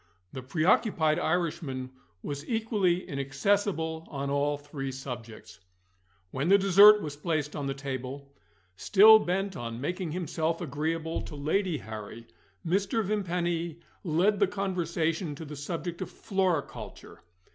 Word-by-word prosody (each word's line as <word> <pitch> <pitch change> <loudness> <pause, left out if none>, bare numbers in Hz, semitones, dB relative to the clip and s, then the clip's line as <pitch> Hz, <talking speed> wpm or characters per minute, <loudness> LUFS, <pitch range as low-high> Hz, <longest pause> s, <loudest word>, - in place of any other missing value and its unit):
The 130 - -5
preoccupied 155 - +2
Irishman 155 -7 -2 0.3
was 145 -1 -5
equally 210 -6 +1
inaccessible 160 +3 -1
on 140 -1 -3
all 145 +1 +1
three 145 -2 -6
subjects. 120 -4 -8 0.7
When 135 +4 -2
the 200 - +7
dessert 200 +2 +7
was 150 -2 -5
placed 150 -1 -2
on 145 -2 -3
the 135 - -2
table 135 0 -6 0.4
still 215 - +7
bent 195 0 -2
on 115 -5 -5
making 175 +4 -3
himself 165 -1 -2
agreeable 160 +1 -2
to 150 - -8
Lady 160 +4 0
Harry 110 -1 -8 0.4
Mr. 195 +6 +1
Vimpany 175 -5 -2 0.2
led 185 +4 +2
the - - +4
conversation 170 -4 -2
to 160 - -8
the 150 0 -8
subject 170 +4 -5
of - - -4
floriculture. 185 -7 -3
160 Hz, 125 wpm, -28 LUFS, 140-185 Hz, 0.7 s, the